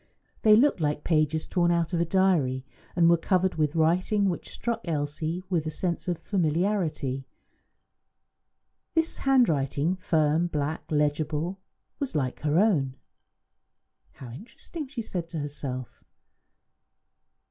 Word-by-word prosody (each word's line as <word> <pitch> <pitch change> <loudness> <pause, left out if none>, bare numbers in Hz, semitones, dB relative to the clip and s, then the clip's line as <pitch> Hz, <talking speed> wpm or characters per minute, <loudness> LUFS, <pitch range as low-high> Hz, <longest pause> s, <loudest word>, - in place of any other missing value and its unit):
They 215 -1 +7
looked 255 -1 +4
like 150 -1 0
pages 155 -1 +1
torn 175 -2 +2
out 170 0 +1
of 170 - +1
a - - +2
diary, 165 -8 +2 0.3
and 170 -1 +5
were 170 0 +6
covered 185 +2 +1
with 155 0 0
writing 185 +5 +2
which 175 - -4
struck 235 -1 -3
Elsie 155 +2 -2
with 170 -4 -1
a - - 0
sense 170 +3 -3
of 175 -2 0
familiarity. 160 -7 -1 1.7
This 325 0 +1
handwriting, 170 - +2
firm, 160 -1 +2
black, 150 -1 -2
legible, 150 +4 0 0.4
was 275 - -3
like 130 -4 -1
her 150 +1 +1
own. 160 -11 +2 1.2
"How 125 -3 -10
interesting!" 235 - -8
she 260 -4 -5
said 175 -5 -4
to 165 - -5
herself. 140 -4 -5
165 Hz, 125 wpm, -27 LUFS, 150-190 Hz, 1.7 s, They